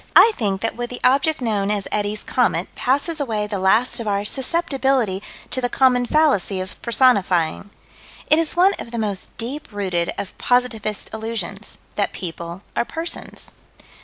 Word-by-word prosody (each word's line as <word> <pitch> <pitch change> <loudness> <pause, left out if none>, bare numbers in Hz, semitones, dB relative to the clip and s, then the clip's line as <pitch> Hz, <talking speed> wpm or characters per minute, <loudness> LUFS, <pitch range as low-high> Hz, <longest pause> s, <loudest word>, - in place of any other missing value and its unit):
I 455 - +9
think 195 -5 -1
that 225 - -1
with 240 0 -4
the 250 - -6
object 275 +3 +3
known 210 -4 0
as 205 -2 -1
Eddie's 210 0 -1
"comet" - - 0
passes 285 +5 +1
away 220 -7 -1
the 205 -2 -3
last 215 +8 +3
of 230 - -4
our 200 0 0
susceptibility 265 - +1 0.3
to 255 - 0
the 245 - 0
common 250 -1 +3
fallacy 270 - +2
of 185 0 -7
personifying. 200 -8 +2 0.6
It 310 - +5
is 330 +1 -1
one 375 +3 +6
of - - -6
the 235 - -5
most 205 -4 -3
deep 260 +6 -3
rooted 185 -4 -1
of 195 - -5
positivist 230 -4 0
illusions 220 -2 -4 0.2
that 205 - 0
people 170 +1 -6
are - - +2
persons. 325 +7 -6
225 Hz, 160 wpm, -21 LUFS, 200-260 Hz, 0.6 s, I